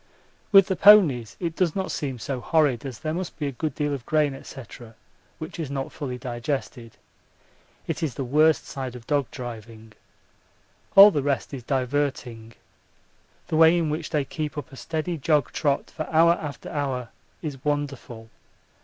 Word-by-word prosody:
With 195 -2 +8
the 190 - -1
ponies 160 - +5
it 170 -3 -3
does 175 -4 0
not 190 -1 -2
seem 135 -4 -3
so 130 +2 -4
horrid, 145 -4 +1
as 125 -4 -7
there 155 +6 -3
must 180 +1 -5
be 150 - -3
a 140 - -2
good 145 +2 -4
deal 145 -1 -1
of 135 -4 -5
grain, 150 -3 +1
&c., - - -10 0.8
which 160 +2 -8
is 155 -5 -3
not 135 -1 -4
fully 130 -5 -5
digested. 120 -1 -5 0.9
It 165 0 -4
is 155 -6 -2
the 135 - -3
worst 155 +5 +3
side 130 -2 -6
of 120 -2 -11
dog 140 -2 0
driving. 115 -3 -9 1.0
All 200 +1 +11
the 145 - 0
rest 140 0 -2
is 135 - -5
diverting. 130 -3 -2 1.0
The 155 - 0
way 165 +2 +6
in 160 -3 0
which 155 - -4
they 150 -3 0
keep 150 +1 -5
up 145 - -6
a - - -11
steady 160 +4 -4
jog 150 0 +1
trot 140 -3 -1
for 155 - -6
hour 165 +1 +5
after 150 -4 -4
hour 130 -5 -3 0.3
is 140 -4 -6
wonderful. 140 -6 -4
145 Hz, 170 wpm, -25 LUFS, 125-160 Hz, 1.0 s, All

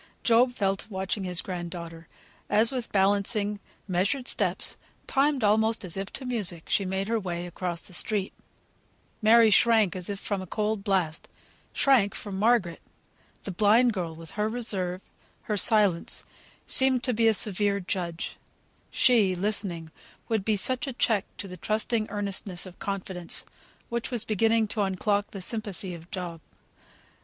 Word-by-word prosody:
Job 240 +2 +4
fell 195 -5 0
to 200 - -10
watching 190 0 -2
his 180 -1 +1
grand 175 -2 -5
daughter, 165 -1 -8 0.4
as 220 +3 +5
with 250 -3 -4
balancing, 205 +1 +1 0.3
measured 200 +9 0
steps, - - 0 0.3
timed 275 -2 +1
almost 220 +1 +2
as 170 - -1
if 195 +1 -4
to 270 - -6
music, 200 -9 -1
she 200 - +1
made 190 +1 -2
her 230 0 +1
way 175 -3 -4
across 175 -1 -3
the 185 - -10
street. 200 +2 +1 0.9
Mary 225 0 +6
shrank 220 -3 +4
as 180 0 -5
if 200 -1 -4
from 200 -2 -3
a 185 - -8
cold 210 +1 -1
blast 185 -6 -1 0.4
shrank 240 -8 +3
from 195 -2 -6
Margaret! 210 -6 +2 0.6
The 195 - -4
blind 220 +6 +4
girl, 170 -5 -4
with 165 0 -10
her 210 +1 -1
reserve, 195 -6 -2 0.4
her 210 - -2
silence, 205 -4 +2 0.4
seemed 260 -2 +3
to 250 - 0
be 225 0 +3
a 225 - +5
severe 200 0 +1
judge; 175 -3 -4 0.5
she, 215 -7 +3
listening, 180 -4 -2 0.4
would 220 -3 0
be 215 +1 +1
such 255 +7 +1
a 270 - -3
check 220 -4 +1
to 200 - -5
the 185 -1 -9
trusting 215 +3 0
earnestness 200 -3 -2
of 185 -1 -12
confidence, 190 -4 -2 0.4
which 235 0 -2
was 240 -4 -1
beginning 225 +1 +2
to 215 - -1
unlock 200 +1 0
the 195 - -8
sympathy 200 -3 -3
of 170 +1 -11
Job. 175 -3 -5
200 Hz, 160 wpm, -27 LUFS, 185-225 Hz, 0.9 s, Mary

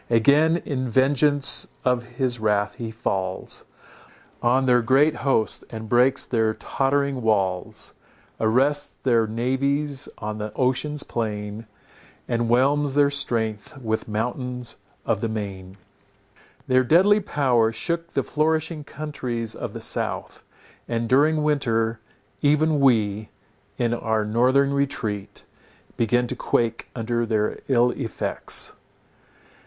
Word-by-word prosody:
Again 145 +8 +4
in 130 -3 -2
vengeance 140 +3 +2 0.2
of 125 -1 +2 0.2
his 125 -3 0
wrath 105 -1 +1
he 115 -2 -6
falls 95 -4 -3 0.8
On 130 +3 +3
their 125 -1 +4
great 135 +6 +3
hosts, 130 -6 +1
and 110 -1 -7
breaks 125 +3 +3
their 110 -2 +1
tottering 140 -1 0
walls; 95 -5 -1 0.5
Arrests 135 +6 +1
their 115 -4 +3
navies 135 +5 -1
on 105 0 -5
the 105 0 -4
ocean's 140 +3 0
plain, 105 -1 -4 0.6
And 120 -1 0
whelms 140 +3 +2
their 145 -1 +4
strength 115 -2 -1
with 110 -4 -2
mountains 125 +3 -2 0.3
of 105 - 0
the 115 - -1
main. 100 -3 -6 0.9
Their 130 0 +3
deadly 190 - +5
power 125 - +2
shook 170 +8 -3
the - - +1
flourishing 155 0 -1
countries 125 -7 -4
of - - -6
the - - -6
south, - - -3 0.5
and 115 -1 -1
during 150 +5 +3
winter, 115 -6 +1 0.4
even, 150 +1 +3
we, 110 -6 +2 0.5
in 120 -1 +1
our 110 -2 0
northern 130 +6 +3
retreat, 115 -8 -3 0.5
began 120 +2 +2
to 125 - -4
quake 115 -2 -1
under 120 0 -1
their 110 -2 0
ill 125 -2 +3
effects. 120 -5 -2
125 Hz, 120 wpm, -24 LUFS, 110-140 Hz, 0.9 s, deadly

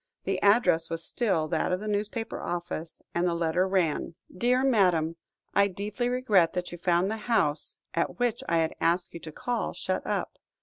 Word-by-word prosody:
The - - -1
address 190 -6 +4
was 165 0 -3
still 190 -10 0
that 165 +1 0
of 180 - +1
the 215 - -6
newspaper 215 +2 -2
office, 170 -2 -5
and 175 +1 +1
the 170 - 0
letter 170 +2 +1
ran 170 -3 0 0.2
"DEAR 250 +6 +2
MADAM, 180 -10 +3 0.4
"I 200 0 +5
deeply 210 +5 -3
regret 215 -10 +3
that 180 0 -3
you 175 - -8
found 175 +3 +2
the 220 - -2
house, 170 -10 0
at 170 - -1
which 240 -2 0
I 170 - +3
had 160 -1 +1
asked 175 +2 +1
you 170 - -6
to 160 - -8
call, 245 - -2
shut - - -2
up. - - -2
180 Hz, 185 wpm, -28 LUFS, 165-215 Hz, 0.4 s, I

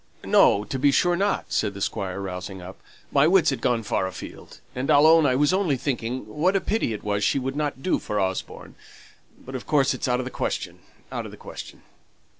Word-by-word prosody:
"No, 100 - +5
to 130 +5 -4
be 145 +2 +4
sure 175 +5 +3
not," 200 +3 -1
said 100 - 0
the - - -7
Squire, 95 -1 -3
rousing 95 0 -6
up. 90 +1 -11 0.3
"My 140 +2 +4
wits 170 -4 +4
had 130 -4 -4
gone 120 -2 +1
far 95 -2 -1
afield, 95 - -10
and 130 +3 -3
I'll 145 0 +6
own 160 -1 +6
I 130 - +2
was 145 +5 +3
only 185 -8 +1
thinking 125 -1 -3
what 180 +6 0
a - - +4
pity 210 - -1
it 105 - -5
was 105 0 -1
she 105 - +2
wouldn't 135 +1 -3
do 185 - +1
for 105 - -3
Osborne. 95 -1 -3 0.7
But, 130 - -9
of 130 - -6
course, 140 -3 +3
it's - - -3
out 125 -1 +2
of 125 - -3
the 130 - -6
question - - -3 0.3
out - - -4
of - - -8
the - - -12
question." - - -10
130 Hz, 220 wpm, -24 LUFS, 105-150 Hz, 0.7 s, I'll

